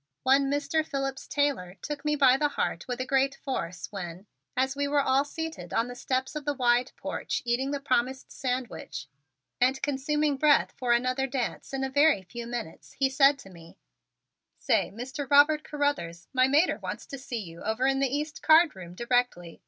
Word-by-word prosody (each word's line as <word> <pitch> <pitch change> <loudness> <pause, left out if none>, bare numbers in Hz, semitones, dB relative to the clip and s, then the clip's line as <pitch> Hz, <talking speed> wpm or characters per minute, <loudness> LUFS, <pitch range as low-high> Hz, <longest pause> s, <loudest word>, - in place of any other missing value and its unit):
One 270 +1 +4
Mr. 290 +2 0
Phillips 275 -3 -4
Taylor 275 -12 -1
took 290 -1 -5
me 300 0 +1
by 265 -3 +5
my 295 +2 +2
heart 290 - -3
with 245 -1 -3
a 255 - -1
great 270 +1 +2
force 180 -12 -4
when, 185 -1 -7 0.3
as 265 +1 +1
we 285 0 -1
were 290 0 +2
all 270 0 +3
seated 320 +2 -6
on 230 +2 +1
the 245 - -7
steps 260 +3 -2
of 300 - -4
the 290 0 -1
wide 245 -1 +2
porch - - -3
eating 245 +3 0
the 285 0 -2
promised 260 -1 -1
sandwich 250 - -4 0.5
and 260 +2 +3
consuming 290 +1 0
breath 295 +1 +4
for 250 -2 -1
another 255 +3 +2
dance 255 -2 -3
in 270 0 -2
a - - 0
very 285 -6 +4
few 235 +5 -8
minutes, 235 -8 -6
he 270 -1 +1
said 275 +1 +5
to 195 -8 -13
me: 165 -2 -15 0.8
"Say, - - +1
Mr. 260 +6 -6
Robert 295 +2 +5
Carruthers, 230 - -2
my 255 0 +4
mater 300 +6 +3
wants - - -6
to 275 - -8
see 255 -2 -5
you 170 -3 -10
over 220 +4 -1
in 270 0 +2
the 275 - +2
east 295 +3 -3
card 320 - +5
room 175 -2 -10
directly. 235 -7 -1
265 Hz, 190 wpm, -28 LUFS, 240-285 Hz, 0.8 s, by